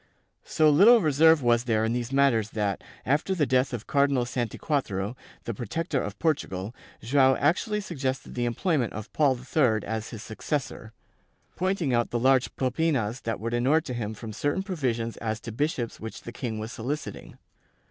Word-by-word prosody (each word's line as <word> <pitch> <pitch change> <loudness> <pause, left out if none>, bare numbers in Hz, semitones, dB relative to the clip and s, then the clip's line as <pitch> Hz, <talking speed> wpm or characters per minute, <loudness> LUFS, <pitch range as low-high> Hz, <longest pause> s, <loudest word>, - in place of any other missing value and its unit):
So 155 -1 +3
little 210 +11 +7
reserve 160 - +4
was 120 0 +3
there 110 -2 +1
in 115 - 0
these 120 0 -3
matters 135 -6 +3
that, 100 -3 -1 0.2
after 150 - +1
the 155 -5 +2
death 130 0 +2
of 120 -3 -5
Cardinal 140 -3 +2
Santiquatro, 120 -3 -2 0.3
the 115 - -3
''protector" 145 - -2
of 105 0 -6
Portugal, 105 - -1 0.3
Joao 130 +2 +4
actually 210 - +1
suggested 135 -9 -4
the 120 -1 -1
employment 120 - 0
of 105 0 -8
Paul 140 -4 +3
III 125 -4 +1
as 110 0 -4
his 110 -4 -8
successor, 115 -1 -4 0.6
pointing 185 -7 0
out 120 0 +1
the 120 - -1
large 130 +1 +2
"propinas" 130 -3 0
that 115 -2 -3
would 115 +3 -3
enure 130 +7 +3
to 145 -6 -6
him 110 -3 -4
from 110 0 -8
certain 145 - -1
provisions 125 - -2
as 110 -1 -3
to 115 - -7
bishops 125 -1 -2
which 110 0 -8
the 120 - -7
king 120 -3 -4
was 110 +2 -5
soliciting. 140 +7 -5
125 Hz, 170 wpm, -27 LUFS, 115-150 Hz, 0.6 s, little